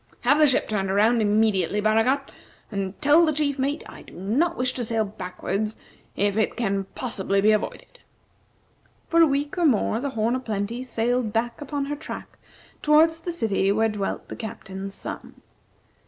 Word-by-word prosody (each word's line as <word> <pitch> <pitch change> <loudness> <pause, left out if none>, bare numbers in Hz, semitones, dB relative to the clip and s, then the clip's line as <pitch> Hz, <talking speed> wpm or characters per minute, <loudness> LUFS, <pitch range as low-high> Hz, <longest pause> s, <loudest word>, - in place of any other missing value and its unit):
Have 285 +5 +4
the 305 - +7
ship 265 - +3
turned 195 -3 -1
around 220 +4 +3
immediately, 210 -2 +2
Baragat, 225 +6 +2 0.4
and 195 -1 -4
tell 300 +3 +6
the 315 - +3
chief 285 -2 -1
mate 285 +3 -1
I - - -11
do - - -15
not 260 - 0
wish 255 0 0
to 245 - -3
sail 225 -1 0
backward 200 +2 -4 0.4
if 200 0 +1
it 220 - 0
can 195 -4 0
possibly 200 -5 -1
be 210 +2 +5
avoided." 215 - -3 1.1
For 335 0 +4
a 330 - +7
week 290 +5 -1
or 345 - +3
more 225 -3 +2
the 280 +3 -2
"Horn 230 -1 0
o' - - -1
Plenty" 220 0 -3
sailed 245 -1 -1
back 235 +4 -2
upon 285 0 -3
her 295 +1 -3
track 305 - -9 0.4
towards 320 +2 +4
the 345 +2 -4
city 210 - +1
where 220 +2 +2
dwelt 205 -2 -3
the - - -7
Captain's 195 -3 -7
son. - - -8
225 Hz, 175 wpm, -24 LUFS, 205-280 Hz, 1.1 s, the